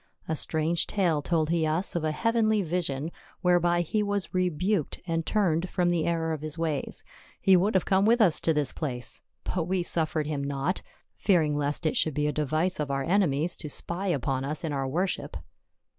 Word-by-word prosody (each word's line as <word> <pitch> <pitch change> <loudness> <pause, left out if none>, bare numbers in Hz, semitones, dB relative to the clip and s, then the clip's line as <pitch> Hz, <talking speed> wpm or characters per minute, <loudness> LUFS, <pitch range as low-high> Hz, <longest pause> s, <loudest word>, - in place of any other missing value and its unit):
A 160 - -1
strange 160 +2 0
tale 175 -7 +1
told 160 0 0
he 170 -1 +1
us 165 +5 0
of 170 - -1
a 155 - +1
heavenly 220 +3 +1
vision, 160 -3 -2 0.3
whereby 175 -1 +3
he 210 +6 -1
was 205 -3 -2
rebuked 185 0 0
and 165 -2 -2
turned 180 -4 +1
from 175 -1 +1
the 170 -2 0
error 165 -1 0
of 155 - -5
his 155 +1 -3
ways. 160 -4 -2 0.4
He 190 - +5
would 195 +3 +2
have 185 - +3
come 190 0 +3
with 235 +3 +4
us 185 -8 +5
to 165 - +2
this 150 -3 +2
place, 125 -6 -3 0.2
but 175 -3 -2
we 185 -1 0
suf 160 -2 0
fered 155 -1 +1
him 145 -2 -3
not, 140 +6 -2 0.4
fearing 160 -7 +2
lest 145 +3 0
it 155 - +1
should 155 - +2
be 150 0 0
a 150 - +1
device 155 +5 -1
of 150 -2 -2
our 135 0 -1
enemies 170 -2 +2
to 150 - -5
spy 175 +6 -2
upon 135 -5 -1
us 150 +4 -1
in 155 -3 -2
our 135 -1 -1
worship." 150 - -2
165 Hz, 205 wpm, -27 LUFS, 150-180 Hz, 0.4 s, He